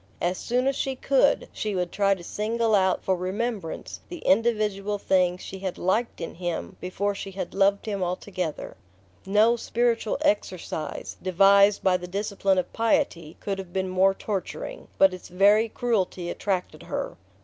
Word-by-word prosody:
As 180 +1 -1
soon 250 +2 0
as 275 0 +1
she 270 0 -2
could, 275 +2 +2
she 210 -2 -3
would 180 -1 -1
try 200 -1 +2
to 175 - -11
single 225 +4 -1
out 190 -2 +3
for 190 - +2
remembrance 190 0 -4
the 350 - -6
individual 210 -1 +2
things 185 -2 +1
she 190 - -7
had 190 -2 -4
liked 220 +6 0
in 165 - -5
him 175 -1 -4
before 200 +3 -1
she 195 0 -6
had 195 0 -5
loved 200 0 +2
him 205 -3 -3
altogether. 180 -2 -4 0.5
No 215 +4 +4
"spiritual 235 -1 0
exercise" 185 - -2
devised 200 +2 +5
by 185 -1 +4
the 180 0 -8
discipline 200 0 0
of 185 - -1
piety 225 - 0
could 195 -1 -3
have 190 -2 -7
been 190 0 -1
more 190 +1 +3
torturing; 215 - -5
but 190 -1 +6
its 185 - -9
very 205 +5 +4
cruelty 190 -7 -1
attracted 190 -3 -2
her. - - -4
195 Hz, 160 wpm, -26 LUFS, 185-215 Hz, 0.5 s, but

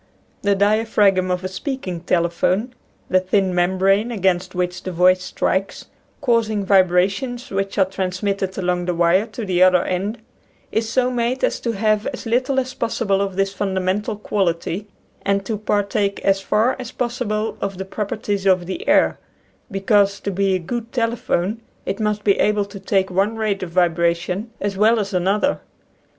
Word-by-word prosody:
The 200 0 +2
diaphragm 205 -2 +3
of 180 0 -1
a - - -1
speaking 185 - -4
telephone 180 +7 0 0.2
— - - -38
the 185 - +5
thin 185 0 +1
membrane 190 +5 +2
against 185 -3 0
which 180 0 -2
the 185 - -5
voice 180 +1 +4
strikes, 195 +1 -2 0.4
causing 225 -6 +1
vibrations 195 +7 +2
which 195 +1 -2
are 190 - +5
trans 185 0 -4
mitted 195 -2 -1
along 180 -1 0
the 180 -1 -1
wire 175 +5 +3
to 230 - -6
the 180 -2 0
other 185 -1 +6
end 195 +5 -2 0.3
— - - -36
is 220 0 -1
so 250 +1 +1
made 245 +1 -1
as - - +1
to 235 - -2
have 215 0 +1
as 255 -2 -5
little 255 +4 +1
as 255 0 -3
possible 200 -5 0
of 195 -2 -2
this 195 0 0
fundamental 195 +1 -1
quality, 195 -1 -2 0.3
and 200 0 0
to 220 - -2
partake 205 -1 0
as 195 0 +2
far 215 +5 +2
as 250 -2 -6
possible 230 -3 -2
of 195 -2 -3
the 190 - -4
properties 200 0 -3
of 185 -2 +3
the 185 +1 -6
air; - - +3 0.5
because 200 0 +2
to 200 - -2
be 195 0 +1
a - - +2
good 230 +6 -5
telephone 230 -3 -1 0.2
it 195 +3 -3
must 210 -1 -1
be 200 -2 +3
able 210 -1 +2
to 200 0 -10
take 190 -1 0
one 200 +4 +1
rate 215 -3 -1
of 185 - -4
vibration 170 +3 +1
as 200 0 -2
well 220 +3 +4
as 200 -1 -3
another. 195 +10 +1
195 Hz, 175 wpm, -21 LUFS, 185-215 Hz, 0.5 s, other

